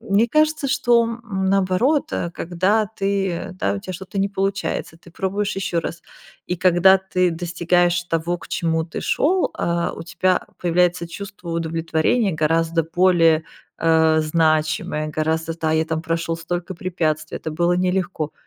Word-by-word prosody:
мне 220 Hz, 0 st, +2 dB
кажется, 305 Hz, 0 st, +2 dB
что, 240 Hz, -3 st, +3 dB
м, 230 Hz, -5 st, -3 dB
наоборот, 195 Hz, +10 st, +1 dB
э, 170 Hz, -, -2 dB
когда 185 Hz, +6 st, 0 dB
ты 195 Hz, -3 st, -1 dB
да, 100 Hz, 0 st, +1 dB
у -, -, -3 dB
тебя 185 Hz, -, -6 dB
что-то 190 Hz, +3 st, -6 dB
не 200 Hz, -, +1 dB
получается, 195 Hz, -4 st, -2 dB
ты 175 Hz, -, -17 dB
пробуешь 195 Hz, +3 st, -2 dB
ещё 175 Hz, -3 st, -1 dB
раз. 165 Hz, +1 st, -6 dB, 0.4 s
И 180 Hz, -, -2 dB
когда 185 Hz, +2 st, +5 dB
ты 185 Hz, -2 st, 0 dB
достигаешь 175 Hz, +1 st, +1 dB
того, 170 Hz, +1 st, -1 dB
к -, -, -13 dB
чему 165 Hz, -1 st, 0 dB
ты 165 Hz, -, -6 dB
шел, 360 Hz, +5 st, +1 dB
а, 170 Hz, 0 st, -1 dB
у -, -, -7 dB
тебя 185 Hz, +1 st, 0 dB
появляется 175 Hz, 0 st, +1 dB
чувство 195 Hz, -2 st, -8 dB
удовлетворения, 165 Hz, +5 st, 0 dB
гораздо 165 Hz, +1 st, +1 dB
более, 165 Hz, -2 st, +3 dB, 0.4 s
э, 160 Hz, -1 st, +4 dB
значимое, 155 Hz, -1 st, +1 dB
гораздо, 160 Hz, +2 st, -1 dB
да, 160 Hz, -1 st, 0 dB
я 160 Hz, 0 st, +2 dB
там 160 Hz, 0 st, -3 dB
прошел 165 Hz, 0 st, -2 dB
столько 175 Hz, +2 st, -4 dB
препятствий, 155 Hz, -4 st, -2 dB
это 160 Hz, -, -5 dB
было 175 Hz, +2 st, +1 dB
нелегко. 180 Hz, -4 st, -1 dB
175 Hz, 155 wpm, -21 LUFS, 165-190 Hz, 0.4 s, когда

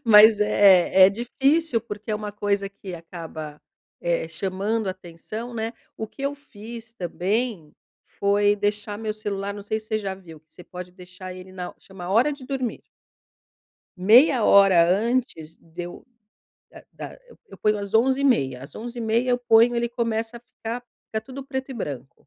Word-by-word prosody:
Mais 215 Hz, -1 st, +8 dB
é 190 Hz, -2 st, +6 dB
é 195 Hz, -, +3 dB
difícil 270 Hz, +5 st, +1 dB
porque 215 Hz, -1 st, -7 dB
é -, -, +1 dB
uma 210 Hz, 0 st, -4 dB
coisa 200 Hz, -1 st, -1 dB
que 195 Hz, -2 st, -9 dB
acaba, 160 Hz, -3 st, -8 dB, 0.4 s
eh, 170 Hz, -1 st, -1 dB
chamando 195 Hz, +5 st, -2 dB
atenção, 185 Hz, +6 st, -7 dB
né. 225 Hz, 0 st, -3 dB, 0.2 s
O 220 Hz, -, -4 dB
que 270 Hz, -, -12 dB
eu 280 Hz, +1 st, -1 dB
fiz 230 Hz, -4 st, -11 dB
também, 190 Hz, -1 st, -2 dB, 0.5 s
foi 205 Hz, +1 st, +3 dB
deixar 205 Hz, 0 st, -2 dB
meu 215 Hz, 0 st, -3 dB
celular 200 Hz, -2 st, -4 dB
Não 205 Hz, 0 st, -8 dB
sei 215 Hz, +2 st, -2 dB
se 215 Hz, -, -18 dB
você 215 Hz, -1 st, 0 dB
já 195 Hz, -2 st, -3 dB
viu, 170 Hz, -5 st, -13 dB
que 155 Hz, 0 st, -45 dB
você 180 Hz, -, -13 dB
pode 180 Hz, +1 st, -8 dB
deixar 185 Hz, 0 st, -10 dB
ele 185 Hz, 0 st, -11 dB
na 180 Hz, -1 st, -6 dB
chama 185 Hz, -2 st, -10 dB
hora 240 Hz, +9 st, +3 dB
de 280 Hz, -2 st, -9 dB
dormir. 265 Hz, -4 st, -3 dB, 1.2 s
Meia 235 Hz, -, +6 dB
hora 190 Hz, -4 st, +6 dB
antes 200 Hz, -6 st, -1 dB
de 165 Hz, +2 st, -9 dB
eu 175 Hz, -, -10 dB, 0.6 s
da -, -, -14 dB
da -, -, -8 dB
e -, -, -19 dB, 0.2 s
eu 195 Hz, -, -12 dB
ponho 210 Hz, 0 st, +2 dB
às 200 Hz, 0 st, -6 dB
11h30, 230 Hz, -, +2 dB
às 140 Hz, -, -11 dB
11h30 235 Hz, +1 st, -1 dB
eu 245 Hz, -, +4 dB
ponho 240 Hz, 0 st, +5 dB
ele 235 Hz, 0 st, 0 dB
começa 230 Hz, -1 st, -2 dB
a -, -, -11 dB
ficar 235 Hz, 0 st, -6 dB, 0.3 s
ficar 220 Hz, -, -3 dB
tudo 265 Hz, +1 st, -8 dB
preto 265 Hz, 0 st, -4 dB
e -, -, -5 dB
branco 140 Hz, -, -7 dB
210 Hz, 175 wpm, -24 LUFS, 185-235 Hz, 1.2 s, Mais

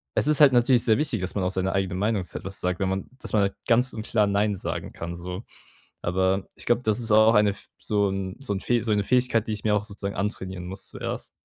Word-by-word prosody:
es -, -, +2 dB
ist 150 Hz, -1 st, +3 dB
halt 145 Hz, -2 st, +8 dB
natürlich 120 Hz, 0 st, +4 dB
sehr 110 Hz, -2 st, +4 dB
wichtig, 140 Hz, -10 st, 0 dB
dass 90 Hz, -, -4 dB
man 95 Hz, -, 0 dB
auch 90 Hz, -, 0 dB
seine 95 Hz, 0 st, -1 dB
eigene 95 Hz, -2 st, -1 dB
Meinung 105 Hz, 0 st, 0 dB
zu 85 Hz, -, -7 dB
etwas 95 Hz, +2 st, -6 dB
sagt, 90 Hz, -1 st, -1 dB
wenn 95 Hz, -, +1 dB
man 95 Hz, 0 st, -3 dB
dass -, -, -6 dB
man 100 Hz, -2 st, +3 dB, 0.2 s
ganz 125 Hz, +2 st, +3 dB
und 110 Hz, -1 st, -6 dB
klar 105 Hz, -3 st, +2 dB
nein 100 Hz, +1 st, +1 dB
sagen -, -, -4 dB
kann, 85 Hz, +1 st, -6 dB
so. 90 Hz, +4 st, -6 dB, 0.6 s
Aber 95 Hz, +2 st, 0 dB
ich -, -, -9 dB
glaube, 120 Hz, +1 st, +2 dB
das 110 Hz, 0 st, +2 dB
ist 115 Hz, -2 st, -3 dB
auch 110 Hz, +1 st, +6 dB
eine 105 Hz, -1 st, +5 dB
f 100 Hz, -, -10 dB
so 100 Hz, -2 st, +1 dB
'n 95 Hz, -1 st, -3 dB
so 135 Hz, -6 st, -4 dB
'n 95 Hz, -, -3 dB, 0.2 s
so 110 Hz, -, 0 dB
'ne 105 Hz, -, +1 dB
Fähigkeit, 125 Hz, -2 st, +2 dB
die -, -, -1 dB
ich 105 Hz, -1 st, -5 dB
mir 105 Hz, -1 st, +3 dB
auch 105 Hz, -, -1 dB
sozusagen 100 Hz, -1 st, -5 dB
antrainieren 95 Hz, -3 st, -3 dB
muss 95 Hz, +2 st, -8 dB
zuerst. -, -, -5 dB
100 Hz, 255 wpm, -25 LUFS, 95-110 Hz, 0.6 s, halt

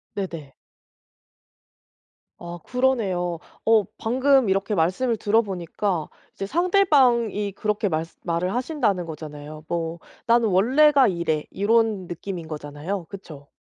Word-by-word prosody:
네네. 165 Hz, -9 st, -5 dB, 1.9 s
아 175 Hz, 0 st, -8 dB
그러네요. 200 Hz, -10 st, 0 dB, 0.3 s
어 220 Hz, -1 st, +5 dB
방금 260 Hz, 0 st, +2 dB
이렇게 195 Hz, +2 st, 0 dB
말씀을 190 Hz, +8 st, +1 dB
들어 215 Hz, +2 st, +3 dB
보니까 185 Hz, -3 st, -3 dB, 0.2 s
이제 195 Hz, -, -5 dB
상대방이 260 Hz, -, +2 dB
그렇게 210 Hz, 0 st, -1 dB
말쓰 160 Hz, 0 st, -3 dB
말을 175 Hz, +2 st, -1 dB
하신다는 245 Hz, -, 0 dB
거잖아요. 155 Hz, -1 st, -9 dB
뭐 165 Hz, 0 st, -3 dB, 0.3 s
"나는 235 Hz, -1 st, +3 dB
원래가 265 Hz, +9 st, +5 dB
이래." 170 Hz, -4 st, -1 dB
이런 215 Hz, -2 st, +1 dB
느낌인 175 Hz, 0 st, -6 dB
거잖아요 155 Hz, +5 st, -5 dB
그쵸? 160 Hz, -7 st, -11 dB
195 Hz, 270 characters per minute, -24 LUFS, 170-230 Hz, 1.9 s, 어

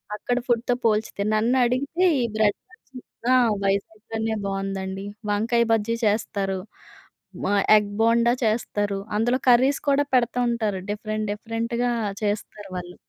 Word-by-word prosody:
అక్కడ 245 Hz, +4 st, -2 dB
ఫుడ్‌తో 240 Hz, 0 st, +1 dB
పోల్చితే 215 Hz, -2 st, +1 dB
నన్నడిగితే 250 Hz, +9 st, +2 dB, 0.2 s
ఈ -, -, +1 dB
బ్రెడ్ 210 Hz, -2 st, +2 dB
బజ్జి 270 Hz, -7 st, -14 dB, 0.3 s
ఆ! 255 Hz, -, +6 dB, 0.3 s
వైజాగ్‌లోనే 220 Hz, +3 st, -2 dB
బాగవుందండి. 195 Hz, 0 st, -4 dB, 0.3 s
వంకాయ 235 Hz, +3 st, +2 dB
బజ్జీ 225 Hz, +1 st, 0 dB
చేస్తారు. 200 Hz, -2 st, 0 dB, 0.9 s
మా 205 Hz, -, +1 dB, 0.2 s
ఎగ్ 205 Hz, -1 st, -1 dB
బోండా 235 Hz, +1 st, +4 dB
చేస్తారు. 205 Hz, -2 st, -1 dB, 0.2 s
అందులో 240 Hz, +4 st, +1 dB
కర్రీస్ 260 Hz, +3 st, +4 dB
కూడా 280 Hz, +1 st, +3 dB
పెడతా 245 Hz, 0 st, +2 dB
ఉంటారు. 215 Hz, -5 st, -1 dB
డిఫరెంట్, 215 Hz, +1 st, -3 dB
డిఫరెంట్‌గా 230 Hz, +3 st, -2 dB, 0.3 s
చేస్తారు 205 Hz, -1 st, -3 dB
వాళ్ళు. 180 Hz, 0 st, -7 dB
220 Hz, 120 wpm, -24 LUFS, 205-240 Hz, 0.9 s, ఆ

